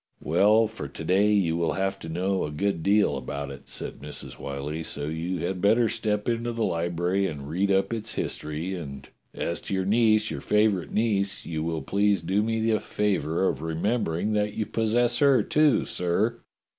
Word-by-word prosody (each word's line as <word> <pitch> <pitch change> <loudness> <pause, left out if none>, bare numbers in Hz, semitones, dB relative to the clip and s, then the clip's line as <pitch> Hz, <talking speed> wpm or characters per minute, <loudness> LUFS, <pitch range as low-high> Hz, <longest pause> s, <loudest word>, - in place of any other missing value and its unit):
"Well, 110 +3 +4
for 110 -9 -6
to 70 - -8
day 100 +3 +3
you 95 -6 +2
will 85 -1 0
have 95 0 -1
to 80 - -8
know 95 +4 0
a - - -2
good 85 +3 -1
deal 100 +4 +3
about 70 0 -5
it," 70 - -11
said - - -5
INIrs. 75 +1 -6
Whyllie, 70 +3 -4
"so 70 -2 -4
you 80 +3 -3
had 90 0 -3
better 110 +4 +4
step 105 -1 -1
into 120 0 0
the 115 -1 -1
library 85 +3 0
and 70 -4 -6
read 90 +6 0
up 95 +3 +2
its 110 -1 -4
history, 80 +5 -3
and 70 -6 -7 0.3
as 85 - -2
to 100 - -3
your 95 0 0
niece, 110 +1 +3
your - - -4
favourite 105 -4 +2
niece, 100 -3 0
you 80 -2 -3
will 80 0 -2
please 100 -2 +1
do 95 +5 +1
me 115 +1 0
the 110 -1 +2
favour 95 -4 0
of 70 - -2
remembering 85 +3 -1
that 105 0 0
you 110 - -1
possess 120 +2 +1
her, 140 -3 +5
too, 150 -2 +3
sir. 100 +7 0
95 Hz, 190 wpm, -26 LUFS, 80-110 Hz, 0.3 s, her